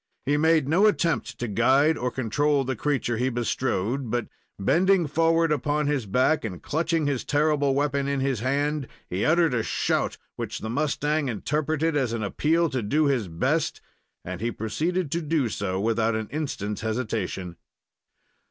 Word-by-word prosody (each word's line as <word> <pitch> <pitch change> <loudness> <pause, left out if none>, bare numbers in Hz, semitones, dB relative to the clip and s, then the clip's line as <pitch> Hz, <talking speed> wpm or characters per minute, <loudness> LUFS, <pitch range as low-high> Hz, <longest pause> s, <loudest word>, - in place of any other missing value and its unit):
He 145 - +2
made 160 -1 +3
no 180 +8 +4
attempt 170 -7 0
to 120 - -3
guide 130 +9 +3
or 125 -2 -1
control 135 +4 +1
the 130 0 -2
creature 125 -3 -1
he 125 +3 +1
bestrode; 120 0 -1
but, 120 0 -2 0.3
bending 180 - +3
forward 165 +2 +2
upon 150 +1 0
his 140 -6 -1
back 130 +9 +2
and 95 -6 -5
clutching 165 +1 0
his 140 -4 -1
terrible 145 -2 +2
weapon 140 -1 0
in 140 -1 0
his 135 -3 0
hand, 140 +3 0 0.2
he 95 +3 -2
uttered 165 -2 +3
a 115 - +1
shout, - - -1 0.2
which - - -4
the 110 - -4
mustang 150 +1 0
interpreted 155 +7 -1
as 130 -5 0
an 115 -2 -2
appeal 160 +11 +1
to 130 - -1
do 145 +9 +1
his 130 -8 +1
best, 80 -1 0 0.5
and 90 +1 -6
he 115 - 0
proceeded 155 - -2
to 170 - 0
do 150 -5 0
so 95 -2 -2
without 115 +1 +1
an 110 -1 -3
instant's 130 -9 -3
hesitation. 110 -6 -3
140 Hz, 165 wpm, -25 LUFS, 115-155 Hz, 0.5 s, no